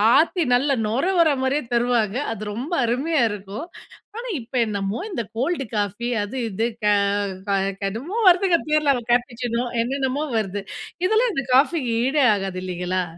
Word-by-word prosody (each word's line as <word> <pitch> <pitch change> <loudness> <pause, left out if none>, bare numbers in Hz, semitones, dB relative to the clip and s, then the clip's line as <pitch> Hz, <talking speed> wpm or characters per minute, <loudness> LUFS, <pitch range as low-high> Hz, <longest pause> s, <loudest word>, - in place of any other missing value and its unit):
ஆத்தி 335 +1 +3
நல்ல 275 +1 +2
நுர 240 +9 0
வர்ற 320 -3 +5
மாதிரியே 275 +3 +1
தருவாங்க. 235 -2 +1 0.2
அது 210 -1 -6
ரொம்ப 260 - -5
அருமையா 275 +6 +1
இருக்கும்! 205 - -7 0.5
ஆனா 480 +2 -5
இப்போ 245 +3 -5
என்னமோ 200 0 -2
இந்த 235 - -2
கோல்டு 275 +3 0
காஃபி 205 +3 -2 0.2
அது, 205 +5 -7
இது 220 +3 -1 0.2
க - - 0 0.6
க - - +2 0.3
கடும் 220 +9 -3
என்னமோ 420 - -3
வருதுங்க 360 -1 +4
பேர்ல 300 -2 +3 0.2
"கேப்புச்சினோ" 245 -1 0 0.2
என்னென்னமோ 270 +3 -1
வருது. 205 -2 -2 0.4
இதெல்லாம் 440 +5 +3
இந்த 275 -4 -2
காஃபிக்கு 270 -3 +2
ஈடே 275 +1 +3
ஆகாது 195 -2 -4
இல்லைங்களா? 180 0 -2
245 Hz, 150 wpm, -23 LUFS, 210-300 Hz, 0.6 s, வர்ற